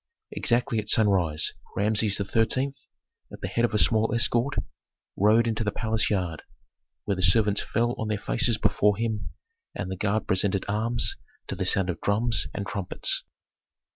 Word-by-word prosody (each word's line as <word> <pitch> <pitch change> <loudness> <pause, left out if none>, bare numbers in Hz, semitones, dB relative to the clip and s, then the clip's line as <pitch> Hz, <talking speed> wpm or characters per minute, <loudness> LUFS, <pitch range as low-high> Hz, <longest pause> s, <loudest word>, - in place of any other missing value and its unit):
Exactly 120 -2 0
at 105 0 -6
sunrise 95 -8 +2 0.2
Rameses 105 0 +2
XIII., 115 +7 0 0.6
at - - -11
the - - -3
head 115 - -1
of 120 - +1
a - - +4
small 110 +1 +3
escort, 120 +4 +1 0.6
rode 110 +4 +4
into 110 0 -1
the 105 - 0
palace 110 0 0
yard, 90 -6 -2 0.6
where 100 - 0
the 95 - -4
servants 100 +3 +3
fell 120 +1 -1
on 110 - -2
their 105 -1 -1
faces - - +1
before 105 -1 +2
him, 110 -2 -3 0.5
and 95 - -4
the - - -3
guard 105 +2 -1
presented 95 0 0
arms 115 +3 0 0.3
to - - -5
the - - -2
sound 95 -2 +2
of 85 - -9
drums 110 +3 +1
and 100 - -5
trumpets. 95 -2 0
105 Hz, 165 wpm, -26 LUFS, 100-115 Hz, 0.6 s, a